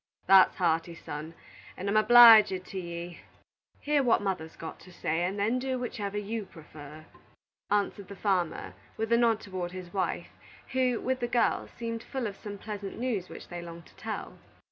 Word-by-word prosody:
"That's 190 0 +6
hearty, 170 -1 0
son, 155 +1 -7 0.4
and 190 - -5
I'm 200 - 0
obleeged 215 -4 +8
to 190 - -6
ye. 170 0 -7 0.6
Hear 295 -1 +2
what 245 -4 +3
mother's 180 -5 -3
got 160 - -8
to 185 - -15
say, 165 -1 -1
and 190 +3 -3
then 220 +5 +1
do 260 0 -2
whichever 210 -5 -4
you 210 +1 -3
prefer," 155 -2 -12 0.6
answered 205 -1 0
the 200 - -9
farmer, 180 - -1 0.2
with 225 +1 -2
a - - +6
nod 230 -2 +3
toward 185 -3 -5
his 185 -2 -8
wife, 185 -3 -2 0.4
who, 255 -2 +1
with 260 0 -1
the 240 - -1
girls, 240 0 +1
seemed 230 -1 -4
full 260 +1 -4
of 205 -3 -4
some 205 0 -8
pleasant 205 -1 -7
news 225 -7 -2
which - - -10
they 175 0 -6
longed 170 -1 -10
to - - -20
tell. - - -6
200 Hz, 180 wpm, -29 LUFS, 175-230 Hz, 0.6 s, obleeged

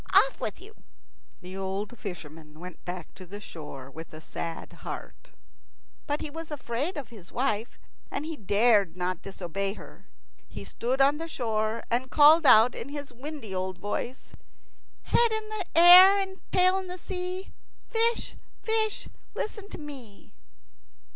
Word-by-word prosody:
Off - - +5
with - - -3
you." 420 +3 -14 0.7
The 185 +1 -9
old 195 +4 -3
fisherman 155 -6 -9
went 180 0 -10
back 175 -2 -6
to 190 - -11
the 205 +3 -7
shore 145 -8 -9
with 160 +3 -10
a - - -8
sad 165 +1 -6
heart; - - -9 0.8
but 290 +1 -1
he - - -3
was 325 +1 -7
afraid 290 +3 -3
of 285 - -6
his 200 -6 -12
wife, 235 -3 -1 0.3
and 300 - -4
he 325 0 -4
dared 205 - +3
not 180 -1 -2
disobey 195 +1 -3
her. - - -14 0.4
He - - -8
stood 255 +3 -1
on 280 +2 +5
the 330 +1 -5
shore, 225 -5 -1
and 250 +2 +1
called 305 +2 +7
out 235 0 +8
in - - -6
his 285 -2 -6
windy 265 -4 -6
old 185 0 -2
voice, 235 +6 -4 0.7
"Head 470 -1 +3
in 440 -1 -3 0.3
air 360 +4 +10
and 385 -1 -3
tail 370 +1 +4
in 365 -1 -6
sea, 365 +1 -5 0.3
Fish, 465 0 +1 0.3
fish, 440 -1 0 0.3
listen 425 -1 -4
to - - -7
me." 270 -9 -11
250 Hz, 150 wpm, -28 LUFS, -, 0.8 s, air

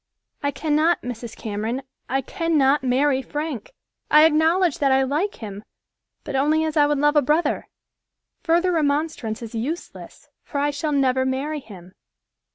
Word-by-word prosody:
"I 285 - 0
cannot, 310 +3 +1
Mrs. 235 -2 -7
Cameron, 220 +5 -3 0.3
I 270 +2 +1
cannot 295 -2 +1
marry 265 +1 +2
Frank. 295 - -5 0.4
I 305 +1 +7
acknowledge 320 +2 +3
that 275 -2 +2
I 265 0 +4
like 305 +10 -1
him, 205 -2 -8 0.6
but - - -5
only 305 +4 +2
as 315 -1 -2
I 295 -1 +5
would 295 0 +1
love 295 +2 +2
a 295 - +6
brother. 300 +5 0 0.7
Further 345 +2 +2
remonstrance 290 -7 -1
is 230 - -8
useless, 270 +10 -6 0.2
for 285 - -6
I 290 +1 +1
shall 290 +2 -3
never 260 -2 +2
marry 275 +4 -2
him." 185 -8 -13
285 Hz, 155 wpm, -23 LUFS, 260-310 Hz, 0.7 s, I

